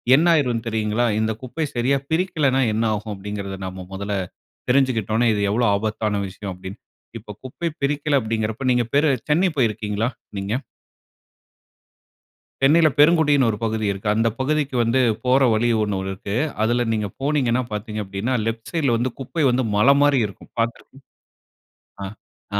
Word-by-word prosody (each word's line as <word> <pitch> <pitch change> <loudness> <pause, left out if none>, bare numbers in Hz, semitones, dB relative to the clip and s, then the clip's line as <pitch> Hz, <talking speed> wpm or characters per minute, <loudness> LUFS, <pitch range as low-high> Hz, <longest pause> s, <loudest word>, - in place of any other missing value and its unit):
என்ன 160 +5 +3
ஆயிரும்ன்னு 125 -7 +1
தெரியுங்களா? 110 +1 0
இந்த 110 0 +1
குப்பை 130 +5 -3
சரியா 125 +3 +2
பிரிக்கலைன்னா 155 -6 +1
என்ன 110 - 0
ஆகும்? 105 0 -4
அப்படிங்கிறதை 100 0 -6
நாம 95 0 -7
முதல்ல 100 +1 -3 0.5
தெரிஞ்சுகிட்டோம்ன்னா 120 -4 +2
இது 105 - -1
எவ்வளவு 120 +3 +2
ஆபத்தான 105 0 -1
விஷயம் 95 +1 -7
அப்படின்னு. 95 +3 -9 0.4
இப்போ 105 -1 -10
குப்பை 130 +6 -4
பிரிக்கல 145 +1 +1
அப்படிங்கிறப்ப, 110 +2 -2
நீங்க 125 -1 +3
பேர் 145 +3 +4 0.2
சென்னை 170 +6 +3
போயிருக்கீங்களா 110 -2 0 0.3
நீங்க? 100 +2 -3 2.1
சென்னையில 155 +3 +6
பெருங்குடின்னு 150 -4 +5
ஒரு 105 - -3
பகுதி 110 -1 -1
இருக்கு. 100 +2 -4
அந்த 115 +1 +2
பகுதிக்கு 145 0 0
வந்து 115 +3 +2 0.2
போற 130 +2 +4
வழி 115 +2 +1
ஒன்னு 105 -2 -1
இருக்கு. 95 +1 -5 0.3
அதில 120 +2 +2
நீங்க 105 -2 -1
போனீங்கன்னா, 135 -4 +1
பார்த்தீங்க 105 0 -4
அப்படின்னா, 100 +6 -3
லெஃப்ட் 115 0 -4
சைட்‌ல 140 -8 +1
வந்து 120 0 -1
குப்ப 150 +4 -2
வந்து 125 +1 +1
மலை 105 +7 +6
மாரி 145 -2 +4
இருக்கும். 100 - -14
பார்த்து 115 0 0
இருக்க 135 0 -20 1.5
ஆ - - +3
115 Hz, 145 wpm, -22 LUFS, 105-135 Hz, 2.1 s, சென்னையில